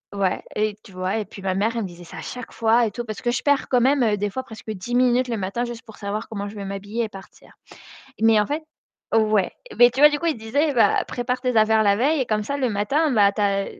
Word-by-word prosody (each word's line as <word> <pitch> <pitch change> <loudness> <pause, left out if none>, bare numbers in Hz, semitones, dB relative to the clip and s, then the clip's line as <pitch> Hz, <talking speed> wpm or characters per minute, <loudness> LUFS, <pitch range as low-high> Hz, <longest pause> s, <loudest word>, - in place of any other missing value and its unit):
ouais, 195 -2 0
et 210 0 0
tu 195 - -15
vois? 185 +3 -2
Et 215 - -2
puis 195 0 -12
ma 190 -1 0
mère, 215 +4 +1
elle 230 - -1
me - - -3
disait 175 0 -12
ça - - -11
à - - -6
chaque 250 -2 -7
fois 230 +1 +3
et - - -5
tout, 240 - -5
parce 215 -2 -6
que 240 - -1
je 245 - -1
perds 285 -1 +2
quand 250 - +3
même 245 -5 +3
des 205 +1 -1
fois 260 +6 -5
presque 220 -2 -11
10 215 +4 -6
minutes 250 0 +3
le 230 - -1
matin 200 +6 -2
juste 240 0 -7
pour 220 -3 -14
savoir 210 +2 -4
comment 205 -2 -4
je 215 - -11
vais 200 -1 -6
m'habiller 205 +4 -4
et - - -7
partir. 195 -1 -14 0.7
Mais 225 -1 +5
en 210 - 0
fait 305 +2 -3 0.5
ouais. 215 -4 +2 0.3
Mais 245 0 +8
tu 260 - -4
vois? 295 - +10
Du 295 - -1
coup, 335 -1 +1
disait, 280 +7 0
bah, 230 - +3
prépare 250 +1 -3
tes 250 -2 -1
affaires 220 0 +4
la 200 0 +4
veille 285 +5 +2
et 250 - 0
comme 215 -1 0
ça 280 +5 -2
le 260 -3 0
matin, 275 +10 +1
bah 205 -3 +5
tu 210 - -4
as 195 -1 +1
220 Hz, 275 wpm, -23 LUFS, 205-250 Hz, 0.7 s, vois